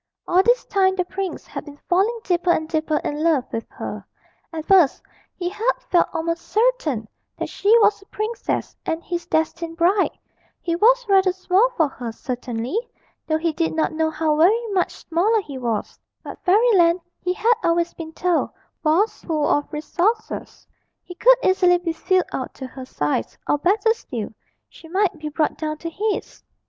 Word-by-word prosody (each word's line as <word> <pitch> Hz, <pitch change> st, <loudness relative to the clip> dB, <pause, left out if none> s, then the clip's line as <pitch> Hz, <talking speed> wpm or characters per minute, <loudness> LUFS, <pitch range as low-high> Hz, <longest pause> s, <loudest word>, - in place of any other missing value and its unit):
All 360 Hz, +1 st, +5 dB
this 485 Hz, +5 st, +2 dB
time 380 Hz, -1 st, +2 dB
the 365 Hz, -1 st, 0 dB
prince 380 Hz, 0 st, -5 dB
had -, -, -7 dB
been 290 Hz, -1 st, -11 dB
falling 400 Hz, +6 st, +2 dB
deeper 355 Hz, -1 st, 0 dB
and 315 Hz, -2 st, +2 dB
deeper 315 Hz, -1 st, 0 dB
in 295 Hz, +1 st, -2 dB
love 315 Hz, -6 st, +2 dB
with 225 Hz, -, -3 dB
her; -, -, -6 dB, 0.5 s
at 320 Hz, -2 st, -5 dB
first 365 Hz, -8 st, +4 dB, 0.3 s
he 350 Hz, -, -3 dB
had 435 Hz, +7 st, 0 dB, 0.2 s
felt 350 Hz, -, +4 dB
almost 335 Hz, 0 st, -2 dB
certain 425 Hz, -, +1 dB, 0.3 s
that -, -, -4 dB
she 400 Hz, -, -2 dB
was 420 Hz, -2 st, +3 dB
a 395 Hz, -, -19 dB
princess 435 Hz, +2 st, -3 dB
and 325 Hz, +1 st, -3 dB
his 345 Hz, -1 st, -4 dB
destined 330 Hz, +1 st, -1 dB
bride; 370 Hz, +4 st, +2 dB, 0.4 s
he 335 Hz, -1 st, -2 dB
was -, -, +4 dB
rather 385 Hz, -2 st, +4 dB
small 375 Hz, +5 st, +2 dB
for 320 Hz, -3 st, +4 dB
her, 245 Hz, -4 st, -6 dB
certainly, 245 Hz, -, -3 dB, 0.5 s
though 315 Hz, -1 st, +2 dB
he 325 Hz, 0 st, -1 dB
did 330 Hz, +1 st, -1 dB
not 320 Hz, 0 st, 0 dB
know 320 Hz, 0 st, +1 dB
how 315 Hz, -1 st, 0 dB
very 420 Hz, +9 st, +4 dB
much 375 Hz, -3 st, +1 dB, 0.2 s
smaller 390 Hz, +7 st, +2 dB
he 280 Hz, -9 st, -7 dB
was; 230 Hz, -4 st, -3 dB, 0.2 s
but -, -, -9 dB
Fairyland, 370 Hz, -4 st, +4 dB, 0.2 s
he 360 Hz, 0 st, -1 dB
had 455 Hz, +5 st, +3 dB
always 340 Hz, 0 st, +1 dB
been 320 Hz, -1 st, -8 dB
told, 350 Hz, +1 st, 0 dB, 0.3 s
was 340 Hz, +8 st, +2 dB
full 310 Hz, -3 st, 0 dB
of 290 Hz, -, 0 dB
resources 360 Hz, +9 st, -2 dB, 0.4 s
he 355 Hz, -, -10 dB
could -, -, +5 dB
easily 360 Hz, -3 st, +4 dB
be 345 Hz, -2 st, -3 dB
filled 370 Hz, +3 st, +1 dB
out 260 Hz, -, -4 dB
to 265 Hz, -, -7 dB
her 260 Hz, 0 st, -9 dB
size, 145 Hz, -, -2 dB
or, 295 Hz, -, +2 dB
better 410 Hz, +7 st, +3 dB
still, 240 Hz, -, -6 dB, 0.4 s
she 325 Hz, -, -15 dB
might 375 Hz, +2 st, +1 dB
be 305 Hz, 0 st, -4 dB
brought 305 Hz, +1 st, -1 dB
down 310 Hz, -1 st, -3 dB
to 335 Hz, +2 st, -6 dB
his. 420 Hz, +4 st, -3 dB
345 Hz, 180 wpm, -22 LUFS, 315-390 Hz, 0.5 s, All